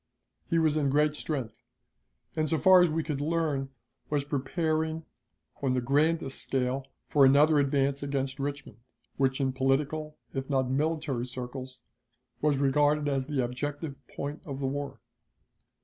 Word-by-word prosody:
He 165 - +2
was 155 -2 +3
in 145 -2 +2
great 150 +2 +3
strength, 145 -6 -4 0.7
and, 155 -1 0
so 160 - +2
far 185 +2 +7
as 175 - +4
we 160 +1 -1
could 150 -3 -3
learn, 150 -3 0 0.4
was 145 -2 0
preparing 155 +3 -1 0.6
on 130 -2 +1
the - - +2
grandest 145 +3 +1
scale 130 0 -1 0.2
for 145 - +4
another 145 +3 +6
advance 140 0 +1
against 135 -1 -2
Richmond, 140 -5 -5 0.4
which 135 0 +1
in 135 -1 +1
political 145 +4 0 0.2
if 135 0 -4
not 130 -2 +1
military 145 -3 -1
circles 130 +1 -7 0.6
was 150 -2 +2
regarded 145 +2 +2
as 135 -2 0
the 145 -4 0
objective 145 +4 -4
point 145 +2 -5
of 135 -2 -5
the 135 - -2
war. 140 +1 -4
140 Hz, 150 wpm, -29 LUFS, 135-150 Hz, 0.7 s, far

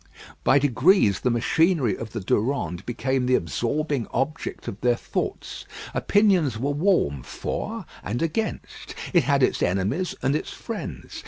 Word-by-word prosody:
By 135 - +5
degrees 140 - +4
the 125 - +1
machinery 130 - +2
of 115 -1 -7
the - - -4
Durande 100 - 0
became 125 +2 0
the 130 - +4
absorbing 120 - -1
object 150 +5 -3
of 100 - -6
their 120 -1 +3
thoughts. - - -4 0.3
Opinions 185 - +3
were 135 +5 -1
warm 145 - +2
for 65 - -4 0.2
and 120 +9 -2
against. 215 +7 -3 0.2
It 175 -4 +4
had 140 -1 +3
its - - +2
enemies 100 - 0
and 135 +2 +2
its - - -2
friends. - - -6
130 Hz, 145 wpm, -25 LUFS, 110-155 Hz, 0.3 s, By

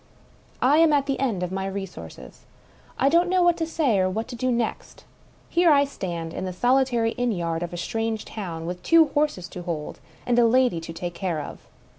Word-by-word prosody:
I 275 +4 +5
am 325 -1 +5
at 280 -1 +2
the 275 -1 -2
end 225 -9 0
of 180 - -3
my 190 0 -2
resources 175 - -8 0.2
— - - -29 0.2
I 270 - +2
don't 340 +5 +3
know 365 -1 +3
what 350 -1 +4
to 325 - -2
say 285 -11 +1
or 185 0 +2
what 220 +4 -3
to 250 - -6
do 255 +2 0
next. 235 -2 -3 0.4
Here 345 -1 +4
I 285 -1 +5
stand 170 -11 -5
in - - -4
the 185 - -3
solitary 245 +1 +2
inn 245 -1 +2
yard 170 -4 -2
of 175 - -4
a 175 - -6
strange 225 +4 -2
town, 170 -7 -6
with 180 +1 -5
two 330 -2 +5
horses 290 - 0
to 180 - -8
hold, 165 -4 -5 0.3
and 245 -1 +2
a 235 - +5
lady 250 -6 +3
to 165 - -7
take 175 +1 -5
care 175 -3 -2
of. 145 - -7
225 Hz, 220 wpm, -24 LUFS, 175-275 Hz, 0.4 s, I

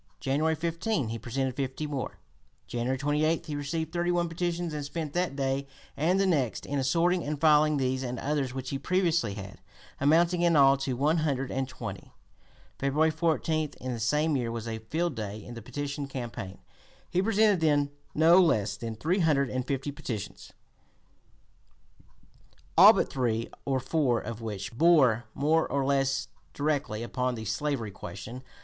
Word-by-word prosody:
January 155 +4 +1
15 165 - -1
he 115 +1 -4
presented 130 +2 -2
fifty 135 +2 -3
more. 145 -3 -4 0.5
January 120 +2 -2
28 150 +3 +1
he 150 - -4
received 160 +3 -3
thirty 175 0 0
one 175 -1 +1
petitions, 170 0 -2
and 150 -1 -3
spent 150 0 -5
that 175 -5 0
day 135 0 -1 0.3
and 175 +6 +2
the 195 - +3
next 145 - 0
in 145 0 -2
assorting 170 +7 +2
and 150 0 -3
filing 150 -1 +5
these 130 -1 0
and 125 -1 -4
others 140 0 -1
which 130 0 -5
he 135 - -2
previously 170 - +1
had, 100 -2 -9 0.4
amounting 170 +5 +3
in 170 -1 +4
all 135 -1 +7
to 135 -1 -2
one 150 +6 +2
hundred 135 -4 -1
and 135 0 -2
twenty. - - -7 0.7
February 150 +4 +2
14, 155 -1 0
in 130 0 -4
the 115 - -5
same 150 +7 +1
year, 120 -3 -1
was 115 -1 -5
a 110 -1 -4
field 160 +9 -2
day 105 -3 -5
in 115 +3 -10
the 115 - -8
petition 145 +4 -4
campaign: 120 -8 -6 0.5
he 180 - +2
presented 210 -2 +3
then 145 -3 +2 0.2
no 165 +4 +6
less 105 - +2
than 115 0 -5
three 165 - 0
hundred 145 -6 +2
and 130 0 -2
fifty 140 +1 -2
petitions, 115 -7 -6 2.2
all - - +10
but - - +1
three 115 -3 -1
or 135 -1 +1
four 130 -2 +1
of 115 0 -7
which 105 -2 -5
bore 130 -6 +4
more 155 +3 +2
or 140 -1 +1
less 135 -1 +1 0.3
directly 140 -7 -1
upon 125 +1 -1
the 110 -1 -6
slavery 135 -4 -2
question. 100 +7 -8
140 Hz, 170 wpm, -28 LUFS, 125-160 Hz, 2.2 s, all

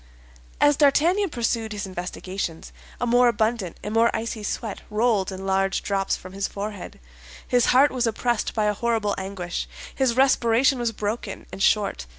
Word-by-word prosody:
As 290 -1 +4
D'Artagnan 335 +7 +3
pursued 230 -4 -1
his 205 -1 -4
investigations, 185 -2 -5 0.3
a - - 0
more 245 +1 +4
abundant 220 -5 0
and 210 - -4
more 230 +1 +4
icy 225 0 -3
sweat 210 0 -4
rolled 210 -3 +1
in 190 0 -7
large 195 0 +1
drops 195 -1 0
from 185 0 -11
his 195 0 -2
forehead; 205 -1 -7 0.5
his 245 -1 +3
heart 270 +3 +5
was 250 -2 0
oppressed 235 0 -1
by 215 -2 +1
a 210 - +2
horrible 220 -1 0
anguish; 190 -2 -4 0.3
his 260 -4 +1
respiration 260 0 +3
was 235 -1 0
broken 210 -1 -4
and 195 - -7
short. 200 - +1
220 Hz, 165 wpm, -24 LUFS, 195-240 Hz, 0.5 s, heart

